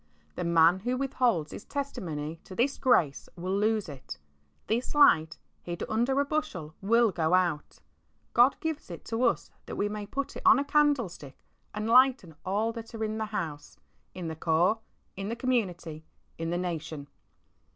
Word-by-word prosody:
The -, -, -4 dB
man 170 Hz, +1 st, +5 dB
who 245 Hz, +5 st, -1 dB
withholds 250 Hz, -, 0 dB
his -, -, -8 dB
testimony 165 Hz, -, -4 dB
to 185 Hz, -, -10 dB
this 265 Hz, +6 st, +1 dB
grace 165 Hz, -, +2 dB
will 185 Hz, +2 st, -2 dB
lose 215 Hz, 0 st, +1 dB
it. 135 Hz, -, -8 dB, 0.5 s
This 235 Hz, +6 st, -1 dB
light, 160 Hz, -, +5 dB, 0.2 s
hid 175 Hz, -1 st, -5 dB
under 240 Hz, +5 st, +1 dB
a 285 Hz, -, +2 dB
bushel, 280 Hz, -, -3 dB
will 230 Hz, +2 st, +4 dB
go 170 Hz, 0 st, +2 dB
out. 175 Hz, -5 st, -1 dB, 0.5 s
God 245 Hz, +3 st, +5 dB
gives 320 Hz, -7 st, -3 dB
it 170 Hz, -, -9 dB
to 225 Hz, +1 st, -2 dB
us 235 Hz, -, 0 dB, 0.2 s
that -, -, -5 dB
we 205 Hz, -, 0 dB
may 210 Hz, -1 st, -5 dB
put 275 Hz, +6 st, -4 dB
it -, -, -6 dB
on -, -, +7 dB
a 280 Hz, -, 0 dB
candle 290 Hz, -5 st, +3 dB
stick 145 Hz, -6 st, -12 dB, 0.3 s
and 215 Hz, +1 st, -3 dB
lighten 250 Hz, -7 st, +4 dB
all 210 Hz, +4 st, 0 dB
that 230 Hz, 0 st, -9 dB
are 220 Hz, -, -3 dB
in 215 Hz, 0 st, -2 dB
the 220 Hz, -, -1 dB
house, 170 Hz, -9 st, -5 dB, 0.4 s
in 180 Hz, -2 st, -5 dB
the 160 Hz, -, -4 dB
Corps, 170 Hz, +7 st, +2 dB, 0.4 s
in 195 Hz, +1 st, -4 dB
the 230 Hz, -, -2 dB
community, 180 Hz, -11 st, -2 dB, 0.4 s
in 165 Hz, 0 st, -2 dB
the 175 Hz, -, 0 dB
nation. 160 Hz, -5 st, -4 dB
205 Hz, 175 wpm, -29 LUFS, 165-240 Hz, 0.5 s, on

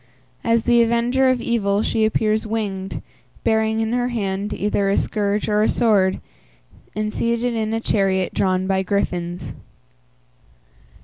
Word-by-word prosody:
As 230 Hz, -1 st, +2 dB
the 240 Hz, -1 st, +4 dB
avenger 235 Hz, +3 st, +2 dB
of 255 Hz, -2 st, +1 dB
evil 205 Hz, -3 st, 0 dB
she 220 Hz, -1 st, +1 dB
appears 215 Hz, 0 st, 0 dB
winged, 200 Hz, -3 st, -3 dB, 0.4 s
bearing 220 Hz, 0 st, +1 dB
in 225 Hz, +1 st, -1 dB
her 245 Hz, 0 st, +1 dB
hand 205 Hz, -3 st, -2 dB
either 205 Hz, -1 st, 0 dB
a 200 Hz, -, +1 dB
scourge 205 Hz, -1 st, -1 dB
or 210 Hz, 0 st, +2 dB
a 215 Hz, -, +3 dB
sword, 205 Hz, -6 st, +2 dB, 0.8 s
and 215 Hz, 0 st, -2 dB
seated 235 Hz, +1 st, 0 dB
in 220 Hz, -1 st, -1 dB
a 225 Hz, -, 0 dB
chariot 195 Hz, -4 st, 0 dB
drawn 185 Hz, -1 st, +1 dB
by 190 Hz, 0 st, +1 dB
griffins. 175 Hz, -4 st, -2 dB
215 Hz, 140 wpm, -21 LUFS, 195-230 Hz, 0.8 s, the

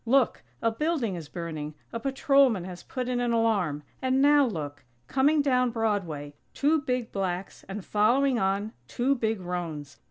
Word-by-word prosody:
Look! 260 Hz, 0 st, +3 dB, 0.2 s
A 230 Hz, -, +3 dB
building 285 Hz, -, 0 dB
is 165 Hz, -4 st, -7 dB
burning! 155 Hz, -3 st, -5 dB, 0.2 s
A 230 Hz, -, -2 dB
patrolman 270 Hz, -4 st, +3 dB
has 180 Hz, -1 st, -8 dB
put 255 Hz, -2 st, -4 dB
in 250 Hz, -1 st, 0 dB
an 240 Hz, -1 st, +1 dB
alarm! 200 Hz, -11 st, +1 dB, 0.2 s
And 260 Hz, 0 st, +2 dB
now 285 Hz, 0 st, +6 dB
look! 145 Hz, -8 st, -5 dB, 0.2 s
Coming 285 Hz, -, +3 dB
down 255 Hz, -3 st, +3 dB
Broadway! 195 Hz, -11 st, -2 dB, 0.2 s
Two 300 Hz, +2 st, +3 dB
big 250 Hz, -4 st, -2 dB
blacks, 185 Hz, -1 st, -3 dB
and 195 Hz, 0 st, -5 dB
following 245 Hz, +5 st, +3 dB
on, 200 Hz, +2 st, 0 dB
two 255 Hz, -, +1 dB
big 225 Hz, -5 st, -1 dB
roans! 170 Hz, -5 st, -5 dB
225 Hz, 160 wpm, -27 LUFS, 180-260 Hz, 0.2 s, now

